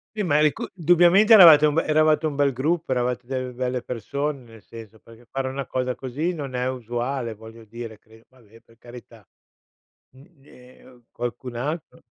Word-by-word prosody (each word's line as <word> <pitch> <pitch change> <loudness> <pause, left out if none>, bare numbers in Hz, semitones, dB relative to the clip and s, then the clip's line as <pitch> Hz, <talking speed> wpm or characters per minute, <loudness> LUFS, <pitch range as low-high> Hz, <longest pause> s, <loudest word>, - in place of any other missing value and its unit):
Sì, 210 - -2
ma 150 -4 +1
il 150 - +3
ricu 150 - -1
dubbiamente 175 +5 +4
eravate 160 -7 +9
un 150 - -1
be 165 - +2
eravate 155 0 +2
un 150 -2 -2
bel 140 -1 +2
gruppo, 155 +4 -2
eravate 125 -1 -2
delle 130 -1 -4
belle 125 0 -3
persone, 140 +4 -4
nel 115 -3 -17
senso, 110 -1 -13
perché 115 +1 -18
fare 135 -1 -3
una 135 0 -5
cosa 125 -1 -2
così 145 +8 -4
non 140 -5 -7
è 125 +1 -1
usuale, 120 -1 -4
voglio 110 +1 -14
dire, 115 -1 -9
credo, 110 0 -21
vabbè, 115 -3 -21
per 115 0 -25
carità. 120 -4 -15 0.9
Mh, 135 - -17 0.2
ehm, 125 -2 -19
qualcun 120 +1 -6
altro 150 +6 -5
130 Hz, 180 wpm, -23 LUFS, 120-150 Hz, 0.9 s, eravate